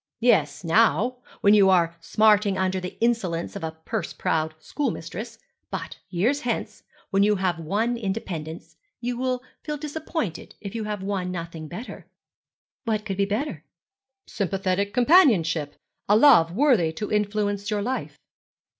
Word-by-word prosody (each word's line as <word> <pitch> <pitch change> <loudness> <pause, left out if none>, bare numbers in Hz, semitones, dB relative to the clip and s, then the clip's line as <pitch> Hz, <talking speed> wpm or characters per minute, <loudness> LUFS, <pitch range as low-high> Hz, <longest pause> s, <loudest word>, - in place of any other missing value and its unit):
'Yes, 200 - +2
now, 180 - +3 0.2
when 205 - +6
you 200 -2 +6
are 170 -3 +3
smarting 210 0 +3
under 190 0 0
the 180 0 -7
insolence 215 -9 0
of 200 - -6
a 160 - -1 0.2
purse - - -3
proud 160 0 -1
schoolmistress; 220 - -4 0.3
but - - -6
years 225 +11 +1
hence, 240 -1 -3 0.3
when 195 0 +3
you 210 +1 +4
have 185 -3 -1
won 210 +9 0
independence, 185 -7 -5 0.2
you 245 0 -2
will 255 0 -1 0.2
feel 300 -1 -4
disappointed 300 - -4
if 200 -2 -7
you 225 -2 -3
have 210 -2 -4
won 190 -2 -2
nothing 170 -2 -6
better.' 215 +10 -8 0.8
'What 215 -3 -1
could 195 -3 -3
be 200 - +2
better?' 220 +10 -3 0.6
'Sympathetic 195 0 -1
companionship 220 - +4 0.3
a 205 - +6
love 225 - +6
worthy 220 - +3
to 210 +6 -5
influence 205 -1 0
your 210 -2 -1
life.' 255 +4 -3
205 Hz, 145 wpm, -25 LUFS, 175-235 Hz, 0.8 s, when